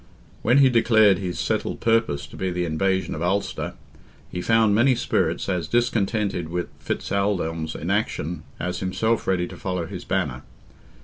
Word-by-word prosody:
When 120 +5 +4
he 135 -2 +7
declared 110 -5 +5
his 90 -3 -3
settled - - -1
purpose 115 -11 +1
to 75 - -13
be 95 - -2
the 90 0 -1
invasion 95 +4 0
of 75 - -5
Ulster, 95 +4 -1 0.6
he 90 - -3
found 115 0 +3
many 120 +5 +4
spirits - - 0
as 90 -5 -1
discontented 105 -7 0
with 90 +1 -3
Fitz - - -4
Aldelm's 85 -6 -1
inaction 80 +1 -2 0.2
as 90 +2 -2
himself 110 +5 0
ready 90 -2 +1
to - - -9
follow 90 -3 -3
his - - -7
banner. 65 0 -1
95 Hz, 160 wpm, -24 LUFS, 85-110 Hz, 0.6 s, he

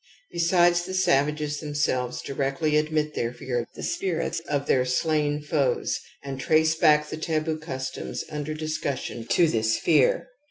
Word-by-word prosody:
Besides, 175 0 +3
the 185 +1 -5
savages 150 -4 +1
themselves 145 -5 -1
directly 140 +3 -1
admit 150 0 +1
their 115 - -1
fear 120 -1 -3
for - - -33
the - - -7
spirita 175 - -2
of 140 -1 0
their 130 - +3
slain 150 +3 0
foes 145 -5 0 0.2
and 135 -1 -5
trace 160 +3 +3
back 150 -1 +4
the 155 - -5
taboo 155 0 -1
customs 130 -5 -5
imder 150 0 -4
discussion 140 -6 -3
to 170 +6 +4
this 110 -5 +1
fear. - - +3
150 Hz, 150 wpm, -25 LUFS, 135-160 Hz, 0.2 s, back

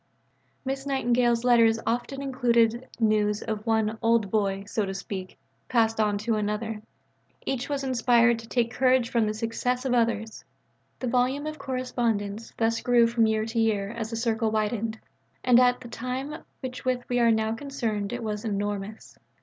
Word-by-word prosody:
Miss 270 +1 -3
Nightingale's 245 -3 +2
letters 230 -2 +5
often 245 +4 -2
included 240 -2 +2
news 210 -2 +2
of 215 0 -4
one 220 0 +1
"old 225 -4 +2
boy," 195 -2 0
so 210 +1 -1
to 195 -1 -4
speak, 190 -1 -6 0.3
passed 225 -2 +2
on 210 -1 +2
to 215 +2 -1
another; 210 +1 -2 0.6
each 260 0 -2
was 280 -1 -2
inspired 240 -2 +3
to 230 - -11
take 235 -1 0
courage 255 -2 +2
from 230 -3 +2
the 215 - -1
success 245 +3 -2
of 255 - +1
others. 225 -2 0 0.5
The 255 - -4
volume 255 +4 +1
of 310 0 -5
correspondence 230 -5 -2
thus 230 0 +1
grew 240 -1 +4
from 230 -1 +2
year 220 0 +1
to 225 +1 -2
year, 210 -3 +1
as 230 -2 -4
the 230 - -4
circle 225 -1 0
widened, 220 +1 -1 0.5
and 250 -1 +6
at 250 0 +3
the 245 - -9
time 255 +4 -4
with 310 - -7 0.4
which 255 -1 -1
we 245 0 +1
are 235 -1 +5
now 220 0 +1
concerned 225 -6 -3
it 245 -1 -4
was 210 -1 -3
enormous. 205 0 -4
230 Hz, 170 wpm, -26 LUFS, 215-245 Hz, 0.6 s, and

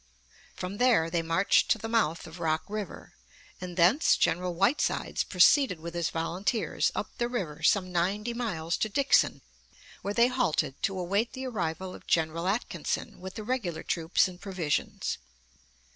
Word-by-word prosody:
From 185 +2 -5
there 230 -10 +3
they 170 -1 +1
marched 165 +4 +2
to - - +4
the 225 - -5
mouth 225 -8 +1
of 160 +2 -11
Rock 160 -1 0
River, 210 -4 -6 0.5
and 180 -1 -7
thence 185 - +5
General 180 +1 0
Whitesides 240 - +1
proceeded 185 - +4
with 170 +1 -7
his 170 -1 -1
volunteers 180 +7 -1
up - - -3
the 240 - +1
river 170 -11 -4
some 185 +2 +2
ninety 200 +7 0
miles 175 -9 -2
to 220 - -1
Dixon, 275 +6 +2 0.6
where 200 +1 -3
they 235 - +6
halted 245 - 0
to 195 - -1
await 200 +6 0
the 260 0 -5
arrival 185 -6 -3
of - - -13
General 165 +1 +1
Atkinson 210 +5 -2
with 190 +1 -8
the 215 - -5
regular 210 -9 -2
troops 165 +3 +1
and 180 0 -11
provisions. 185 -7 -2
185 Hz, 160 wpm, -28 LUFS, 165-225 Hz, 0.6 s, they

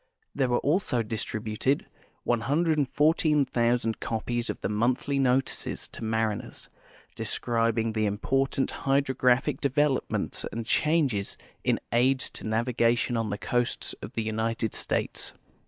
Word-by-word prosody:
There 135 -3 +1
were 120 - +3
also 145 -6 +1
distributed 110 +4 -1 0.4
114,000 140 -3 +2
copies 120 +1 -2
of - - -3
tbe 95 - -1
monthly 125 +6 +1
notices 130 0 0
to - - -8
mai 110 0 +1
i - - -2
ners, - - -10 0.4
describing 115 -1 0
the 110 -1 +1
important 135 +6 0
hydrographic 135 -1 +1
develoi)inents 140 0 0
and 115 -1 -4
changes 140 -9 +1 0.3
in - - +2
aids 130 +2 +2
to - - -7
navigation 120 +1 +1
on 115 -2 -1
tlie 105 +1 -4
coasts 120 -1 -1
of - - -8
the 115 - -1
United 110 0 -1
States. - - -1
120 Hz, 125 wpm, -27 LUFS, 115-135 Hz, 0.4 s, were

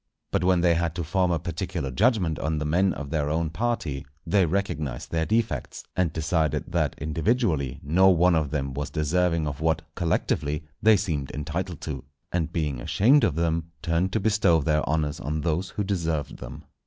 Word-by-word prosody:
But - - +1
when 90 -1 +3
they 85 -1 +4
had 85 -1 -1
to 85 - -2
form 90 +3 +1
a 85 - +2
particular 85 -2 -4
judgment 95 - +2
on 80 0 -1
the 75 - -2
men 90 +5 +2
of 70 -4 -6
their 75 -2 0
own 80 0 0
party, 85 - -2 0.2
they 90 +1 +3
recognized 75 -8 -2
their 80 -1 0
defects, 115 +1 -1
and 90 -3 +1
decided 80 -1 -1
that - - 0
individually 80 - 0
no 90 +7 +5
one 90 0 +4
of 80 -3 +1
them 70 -2 -2
was 70 +1 -3
deserving 80 +2 +1
of 70 0 -5
what, 80 0 +1
collectively, 75 -3 -1 0.2
they 110 0 +6
seemed 75 -8 -2
entitled 80 +4 -4
to; 70 -5 -5 0.3
and 85 -2 -1
being 75 -7 -2
ashamed 130 - +4
of 85 -9 +2
them, 85 0 -1
turned 85 +2 +1
to 110 - +2
bestow 100 -5 +3
their 75 +1 +1
honours 75 0 0
on 75 -2 -2
those 85 +4 -1
who 105 - -3
deserved 85 -7 -2
them. 70 +5 -9
80 Hz, 185 wpm, -26 LUFS, 75-90 Hz, 0.3 s, they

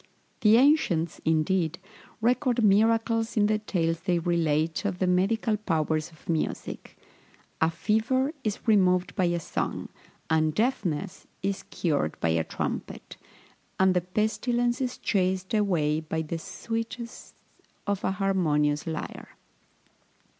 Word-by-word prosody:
The 215 +1 +6
ancients, 235 - +3
indeed, 160 +1 +1 0.4
record 245 0 +2
miracles 225 +2 +3
in 205 - +5
the 215 0 +2
tales 165 -6 -1
they 175 +2 0
relate 165 -2 0
of 200 -3 -2
the 185 - +1
medicinal 210 +5 +2
powers 160 -5 -1
of 160 -2 -21
music. 165 -2 -3 0.6
A 160 - +4
fever 225 - +1
is 215 0 -3
removed 185 -4 +3
by 185 - +2
a 175 0 +1
song, 165 - -3 0.4
and 155 -1 +2
deafness 200 - -1 0.2
is 195 0 -2
cured 145 - -1
by 85 - +1
a 80 0 +2
trumpet, - - -5 0.6
and 190 0 +5
the 180 - +2
pestilence 240 +6 0
is 255 -1 -2
chased 190 -1 0
away 170 -8 +2
by 160 0 -3
the 165 +2 -4
sweetness 230 +5 -6 0.5
of 200 -1 -1
an 190 - +1
harmonious 155 -7 +1
lyre. 160 -1 -6
185 Hz, 125 wpm, -27 LUFS, 160-220 Hz, 0.6 s, The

